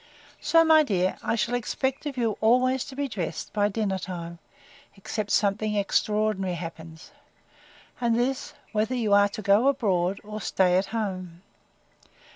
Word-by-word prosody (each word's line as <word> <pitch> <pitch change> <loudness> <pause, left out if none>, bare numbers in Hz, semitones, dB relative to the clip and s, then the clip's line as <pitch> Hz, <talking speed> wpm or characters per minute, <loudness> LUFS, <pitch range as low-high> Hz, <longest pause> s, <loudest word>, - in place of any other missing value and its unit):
So, 330 0 +4
my 320 -1 +6
dear, 190 -9 0
I - - 0
shall 225 +2 -1
expect 265 +4 -2
of 275 -3 -5
you 225 -4 0
always 255 +3 +3
to 285 -3 -10
be 285 0 -2
dressed 190 -9 -5
by 205 -1 +2
dinner 195 -2 -1
time, 170 -2 -7 0.6
except 205 +1 -4
something 210 +1 +1
extraordinary 205 -2 0
happens; 165 -1 -9 0.9
and 235 -2 +1
this, 255 +2 -2 0.2
whether 220 +4 0
you 220 -4 +1
are 205 0 +5
to 210 +1 -7
go 205 +6 +4
abroad, 195 -9 +1
or 215 0 -7
stay 180 -2 +2
at 190 +1 +1
home. 185 -5 -4
210 Hz, 150 wpm, -26 LUFS, 190-245 Hz, 0.9 s, my